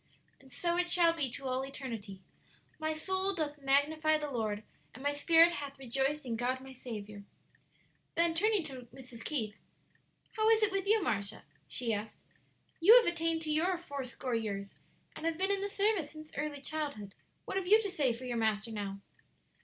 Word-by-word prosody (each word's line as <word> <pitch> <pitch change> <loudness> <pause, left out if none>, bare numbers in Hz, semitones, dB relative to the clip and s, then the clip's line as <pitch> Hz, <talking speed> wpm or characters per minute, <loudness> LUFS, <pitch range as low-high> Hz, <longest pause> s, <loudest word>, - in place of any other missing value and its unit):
And 265 -1 -19
so 345 +5 -1
it 355 0 +1
shall 340 -1 +5
be 295 -6 0
to 270 +3 -8
all 255 0 0
eternity. 225 -8 -7 0.6
'My 315 0 0
soul 375 +5 0
doth 300 -3 -3
magnify 310 +3 +3
the 300 -1 -4
Lord, 215 -4 -2 0.3
and 260 - -10
my 285 - +2
spirit 330 +4 +6
hath 285 -4 -5
rejoiced 270 +3 -1
in 235 -2 -2
God 250 +3 -1
my 265 0 -11
Saviour.'" 210 -5 -7 0.9
Then 335 0 +3
turning 410 +2 +2
to 260 -5 -6
Mrs. 250 -2 -11
Keith, 220 -9 -1 0.8
"How 435 0 +2
is 445 -1 +5
it 420 - +3
with 390 0 -2
you, 430 -1 +4
Marcia?" 200 - -2 0.2
she 235 -3 -1
asked; 210 +1 -5 0.6
"you 400 +8 +9
have 485 - +5
attained 330 -1 +1
to 310 - -2
your 350 +4 +2
four 285 -5 -6
score 255 0 -5
years, 200 -3 -3 0.4
and 325 - -3
have 330 -1 -1
been 380 +2 +2
in 395 -1 0
the 400 - -2
service 400 -6 +1
since 310 0 -11
early 290 -1 -3
childhood. 285 -10 -4 0.3
What - - -3
have 375 -2 -2
you 430 +3 +7
to 400 - -2
say 290 -9 +2
for 235 +2 -6
your 245 -1 -2
Master 220 0 0
now?" 200 -2 -5
285 Hz, 190 wpm, -32 LUFS, 240-340 Hz, 0.9 s, you